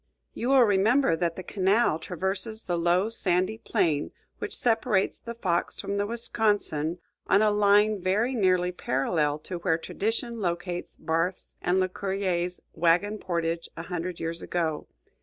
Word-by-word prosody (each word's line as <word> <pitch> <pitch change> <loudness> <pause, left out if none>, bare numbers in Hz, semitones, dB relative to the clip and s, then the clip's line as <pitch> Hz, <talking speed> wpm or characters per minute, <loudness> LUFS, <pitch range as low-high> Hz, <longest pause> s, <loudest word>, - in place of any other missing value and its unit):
You 240 - -2
will 270 -2 +7
remember 210 0 +3
that 170 0 -1
the 185 - -6
canal 195 -1 +2
traverses 190 +5 -3
the 175 - -1
low 175 +4 +2
sandy 185 0 0
plain 165 -12 0 0.3
which - - -4
separates 225 -4 +1
the 235 0 -7
Fox 180 -7 -1
from 200 - -3
the 205 0 0
Wisconsin 205 -8 0 0.3
on 200 +3 +4
a 215 - +4
line 205 0 +4
very 210 +8 +1
nearly 185 -5 +2
parallel 150 -1 0
to 180 -2 -5
where 170 -2 +1
tradition 225 +6 -3
locates 175 -1 -3
Barth's 165 +3 -2
and 180 +2 +2
Lecuyer's 185 -1 -1
wagon 175 +6 +2
portage 170 -2 -2
a 165 - -5
hundred 175 0 -4
years 165 0 -4
ago. 160 -3 -2
185 Hz, 145 wpm, -27 LUFS, 170-210 Hz, 0.3 s, will